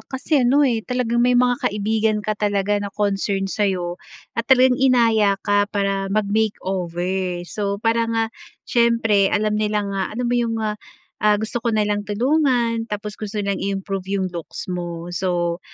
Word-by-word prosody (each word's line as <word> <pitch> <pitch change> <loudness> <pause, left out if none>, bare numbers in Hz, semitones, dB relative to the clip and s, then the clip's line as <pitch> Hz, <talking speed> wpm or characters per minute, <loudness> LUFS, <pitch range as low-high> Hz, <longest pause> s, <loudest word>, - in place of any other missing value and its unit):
kasi 275 +2 0
ano, 270 +4 +4
eh, 235 -4 +1
talagang 240 0 -1
may 245 0 +4
mga 245 0 +2
kaibigan 215 +1 0
ka 215 - 0
talaga 205 -1 0
na 200 - -3
concerned 195 -1 -1
sa 205 -2 +1
'yo 175 -2 -3 0.3
at 230 0 -3
talagang 260 0 +5
inaya 225 -6 +4
ka 205 0 +2
para 195 -1 -1
mag-makeover. 190 -4 -1
So, 200 +2 -3
parang, 230 +1 0
ah, 225 0 0 0.3
siyempre 230 -4 +3
alam 210 0 +1
nila 210 -1 0
nga, 195 -1 -2
alam 250 - -1
mo 245 - +1
'yong, 230 -1 0
ah, 210 0 -3 0.4
ah, 210 -1 +4
gusto 220 +3 -3
ka 230 0 -1
nilang 205 -1 0
tulungan, 240 -1 +1
tapos 210 0 -5
gusto 215 0 -5
nilang 200 -1 -2
i-improve 195 -1 -3
'yong 190 -1 -1
looks 170 -2 -6
mo. 175 -1 -5
So, 175 -1 -1
210 Hz, 165 wpm, -21 LUFS, 195-230 Hz, 0.4 s, talagang